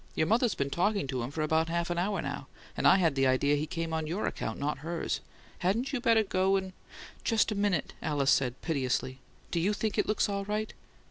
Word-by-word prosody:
Your 155 - +2
mother's 230 +4 +2
been 140 0 -2
talking 200 +3 +1
to 130 -2 -3
him 120 +3 -4
about 160 +1 +1
half 170 +1 -1
an 175 - 0
hour 200 +3 0
now, - - -5 0.3
and - - +2
I - - +8
had 165 -6 +3
the 135 -1 +2
idea 140 +3 +3
he 150 +2 -2
came 165 -1 -3
on 160 -1 -1
your 180 +7 -2
account, 110 - -3
not 145 -1 -2
hers. 165 +3 -2 0.4
Hadn't 230 +10 0
you 260 - -1
better 230 -3 +4
go 190 -1 +2
and 190 -1 -2 0.3
" - - -16
"Just 225 -1 +2
a - - -1
minute." 200 -6 0
Alice 145 -2 +1
said, 125 -2 +1
piteously. 130 -4 -1 0.3
"Do 170 - +1
YOU 195 +5 +2
think 215 0 -1
it - - +1
looks 215 - +2
all 200 -1 -2
right?" 210 +2 -2
170 Hz, 225 wpm, -30 LUFS, 145-205 Hz, 0.4 s, I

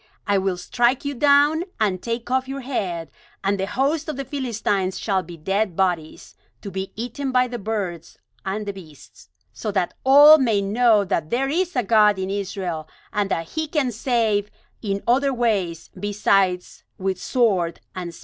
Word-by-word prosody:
I 200 -1 +2
will 190 -1 -1
strike 240 +9 +1
you 285 - -1
down, 290 +4 +4 0.2
and 195 -4 0
take 235 +1 -4
off 260 0 +1
your 275 +1 -5
head, 180 - -3 0.3
and 195 0 0
the 190 - -1
host 290 +7 0
of 305 - -3
the 275 - -4
Philistines 225 -8 -2
shall 195 -3 0
be 170 -1 -11
dead 195 +3 -1
bodies, 175 -4 -2 0.3
to 200 - -6
be 190 +1 -4
eaten 245 +4 -4
by 250 0 +3
the 240 -1 -6
birds 195 -6 -4 0.3
and 205 +2 -3
the 200 - -4
beasts; 160 -7 -15 0.2
so 215 - -5
that 185 -3 0
all 290 +4 +8
may 230 -6 +2
know 210 +1 +3
that 160 -4 -1
there 270 +3 0
is 350 +3 -1
a 250 - +1
God 210 -1 +4
in 190 0 -3
Israel, 185 -5 -4 0.3
and 205 -1 0
that 165 -3 -2
He 315 0 -3
can 295 -5 0
save 220 -3 0 0.3
in 200 -2 -3
other 270 +3 +3
ways 200 -9 -1
besides 195 -2 0
with 190 -1 -2
sword 190 -9 +1
and 180 -2 -5
spear." - - -14
205 Hz, 180 wpm, -22 LUFS, 190-255 Hz, 0.3 s, all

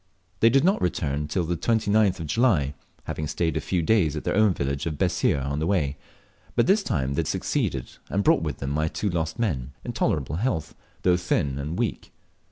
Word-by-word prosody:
They 115 - +6
did 135 +3 +4
not 190 +4 +3
return 80 -5 0
again 75 +1 -2
till 85 +4 0
the 85 +1 -1
29th 105 -2 +2
of - - -4
July, 80 - +2 0.3
having 75 - -4
stayed 80 +1 -1
a - - 0
few 90 -3 -1
days 85 -6 +3
at 75 - -4
their - - 0
own 110 -1 +5
village 70 +3 -2
of 75 -2 -3
Bessir 70 - +1
on 70 +2 -2
the 80 - -1
way; 75 -8 +1 0.6
but - - +4
this 200 +3 +4
time 70 - -1
they 70 - -1
had 80 - 0
succeeded 65 -3 -1 0.2
and 100 - 0
brought - - +4
with - - -3
them 70 - -4
my 75 +2 +1
two 100 +4 -2
lost 80 -2 -2
men, 70 - -2
in - - -4
tolerable 75 0 0
health, 90 - -1 0.3
though 90 -1 +4
thin 70 -6 0
and 75 +4 -4
weak. - - -2
80 Hz, 215 wpm, -25 LUFS, 70-100 Hz, 0.6 s, They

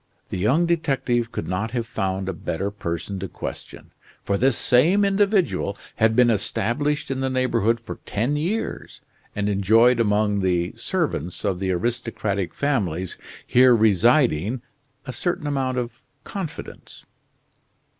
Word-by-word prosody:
The - - -4
young 135 - +3
detective 135 -8 0
could - - -4
not 95 +5 -2
have 115 - -1
found 95 -3 -2
a 95 - -1
better 90 +4 -3
person 95 0 -4
to 95 - -4
question, - - -8 0.3
for 100 - 0
this 125 +3 +2
same 175 +12 +4
individual 195 - +1 0.2
had 110 0 +3
been 125 -1 +5
established 140 +8 -1
in 135 - -2
the 135 0 0
neighborhood 120 -3 +1
for 115 - -8
ten 120 +8 -1
years, 180 +10 -3 0.3
and 105 0 -1
enjoyed 110 +5 +4
among 105 -2 +2
the 90 -2 0
servants 85 +5 -2
of 90 -2 0
the 95 -1 -2
aristocratic 105 -1 -2
families 95 - -1 0.3
here 125 0 +6
residing 115 - +3 0.4
a 130 - -6
certain 170 +5 -2
amount 135 -3 -1
of 120 -1 -4 0.2
confidence. 190 -6 -8
115 Hz, 135 wpm, -23 LUFS, 100-135 Hz, 0.4 s, here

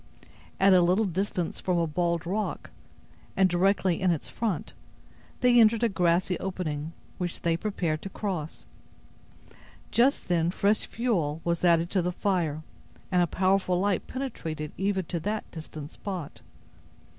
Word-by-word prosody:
At 195 0 +6
a 180 - +6
little 185 +5 +3
distance 185 -2 -2
from 180 -2 0
a 170 - +2
bald 170 +1 -1
rock, 205 +4 -3 0.7
and 190 -1 +5
directly 185 0 +2
in 185 - +3
its 165 -4 -1
front, 215 -9 -3 0.7
they 245 -1 +6
entered 225 +1 +5
a 235 - +4
grassy 180 -1 +1
opening, 165 -5 -4 0.3
which 175 -2 -3
they 165 -1 +2
prepared 170 -5 -2
to 195 - -6
cross. 185 -6 -4 1.3
Just 255 +4 +3
then 170 -2 +2
fresh 200 +4 +1
fuel 175 -11 -1
was 170 0 -1
added 170 -1 +3
to 190 - +2
the 180 +1 -1
fire, 170 -5 -1 0.5
and 180 -1 +4
a 175 - +3
powerful 185 0 +1
light 195 -2 0
penetrated 165 - -5
even 190 -1 0
to 170 +1 -3
that 210 +6 -2
distant 155 -2 -8
spot. 185 -7 -6
180 Hz, 145 wpm, -27 LUFS, 170-200 Hz, 1.3 s, At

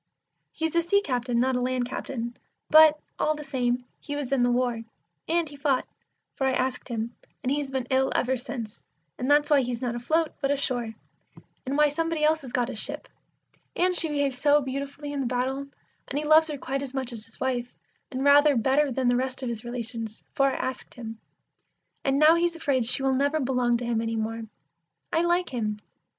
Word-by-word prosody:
He's 320 0 -3
a 335 - +5
sea 345 +4 +3
captain, 245 -4 -1
not 260 +1 +2
a 250 - 0
land 250 -1 0
captain, 240 -2 -5 0.4
but, 310 -1 +8 0.2
all 310 - +2
the 300 - -7
same, 250 -3 -1
he 290 - -5
was 285 -3 -4
in 270 -2 +2
the 245 - +3
war, 245 -1 +1 0.5
And 335 0 +1
he 290 - -11
fought, 280 -2 +1 0.5
for 270 - 0
I 265 - +2
asked 255 0 -1
him, 235 -1 -4 0.3
and 255 - 0
he's 285 -1 -1
been 265 -2 -2
ill 265 0 +3
ever 260 +1 +2
since, 240 -4 -6 0.4
and 255 - -1
that's 295 +1 +4
why 285 -2 +6
he's 245 -2 -3
not 245 -2 -2
afloat, 310 +7 0
but 275 - +1
ashore; 250 -5 -1 0.7
And 275 +2 -1
why 300 0 +5
somebody 325 +1 -1
else 315 +1 +3
has 260 -3 -9
got 245 -1 +1
his 225 - -4
ship; - - -2 0.7
and 360 +1 +2
she 330 -2 +3
behaved 285 -2 0
so 290 +3 +4
beautifully 280 +2 -5
in 285 - -2
the 265 - 0
battle, 260 +3 -1 0.4
and 280 - -3
he 295 - -1
loves 310 +1 +6
her 300 -2 -4
quite 275 +1 -3
as 275 -1 -6
much 260 -2 -2
as 220 -2 -8
his 225 - -16
wife, 250 -2 -2 0.3
and 260 0 -3
rather 285 +1 +6
better 270 +4 +2
than 255 0 0
the 245 - +4
rest 260 +1 -1
of 250 - -2
his 230 -2 -5
relations, 230 -2 -5
for 275 -3 +3
I 270 - 0
asked 260 - -4
him; 225 -2 -7 0.8
and 270 0 +2
now 305 +2 +7
he's 340 0 +1
afraid 275 -7 0
she 250 +3 +2
will 270 0 +2
never 285 +4 +1
belong 250 -3 +1
to 240 - -5
him 235 -1 0
any 230 0 -2
more. 225 +1 -2 0.7
I 325 - +3
like 345 +1 +1
him. 215 -4 -2
265 Hz, 210 wpm, -26 LUFS, 245-290 Hz, 0.8 s, but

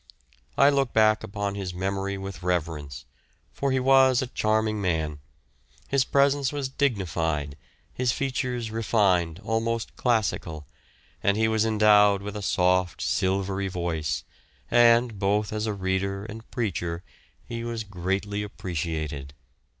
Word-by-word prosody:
I 140 +2 +6
look 135 -3 0
back 110 -1 +4
upon 100 0 -3
his 95 -3 -5
memory 95 +1 -2
with 95 -2 -7
reverence, 75 -6 -3 0.5
for 140 -1 -1
he 130 - +2
was 130 -1 +5
a 130 - 0
charming 110 -2 0
man; 80 -5 -1 0.7
his 135 -1 +2
presence 140 -1 +2
was 140 -2 -3
dignified, 85 - -1 0.4
his 125 -1 +1
features 125 -2 -2
refined, 95 -7 +1
almost 115 +1 -1
classical, 100 - 0 0.6
and 100 +1 +2
he 110 0 +3
was 110 0 +2
endowed 105 -2 +5
with 105 +1 -6
a 105 - -4
soft, 90 -2 +1
silvery 95 +1 0
voice, 85 -5 -2 0.5
and, 120 -2 +5
both 105 +2 +1
as 110 +1 -2
a 105 - -1
reader 95 +1 -2
and 110 +1 -9
preacher, 85 -7 -3 0.4
he 115 0 -5
was 115 -1 -3
greatly 100 +1 -2
appreciated. 80 -7 -4
100 Hz, 130 wpm, -26 LUFS, 90-115 Hz, 0.7 s, I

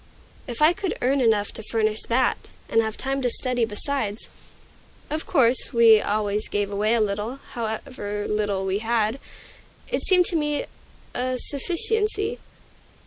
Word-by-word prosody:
If 245 +4 -1
I 315 +3 +7
could 390 0 -3
earn 270 +2 +2
enough 215 -4 +2
to - - -6
furnish 220 0 0
that, 250 +2 +1 0.2
and 225 - +3
have 220 -1 -3
time 270 0 -2
to 250 - +1
study 245 -1 +1
besides, 225 0 -2 0.8
of 310 +1 -3
course 250 -2 +2
we 225 -2 +7
always 210 0 -1
gave 205 -1 -1
away 210 +3 +2
a - - +2
little, 210 +4 -1 0.2
however 220 -3 -4
little 205 -2 -1
we 190 +1 0
had, 225 +2 0 0.7
it - - -1
seemed 365 -2 +4
to 345 - -1
me 295 -2 0 0.5
a 255 +1 -1
sufficiency. 425 - -1
235 Hz, 145 wpm, -24 LUFS, 210-275 Hz, 0.8 s, I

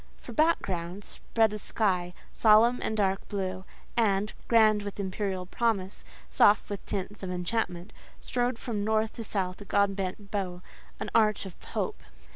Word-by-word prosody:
For - - -10
background, 195 - 0
spread 220 0 0
a 210 - -4
sky, 180 -4 0 0.2
solemn 225 +3 +5
and 220 - -2
dark 195 -2 0
blue, 190 -2 -3 0.3
and—grand 215 0 +3
with 205 0 -6
imperial 190 -1 -2
promise, 200 -2 -1 0.2
soft 205 0 +4
with 200 - -4
tints 200 +2 -4
of 190 - -4
enchantment—strode 215 +6 -3
from 220 -4 -3
north 220 +1 +1
to 230 - -6
south 190 -3 -2
a - - -8
God 200 0 +2
bent 195 +1 -4
bow, 185 -3 -3 0.4
an - - -4
arch 215 -3 +3
of 190 - -11
hope. - - -3
205 Hz, 145 wpm, -29 LUFS, 185-220 Hz, 0.4 s, solemn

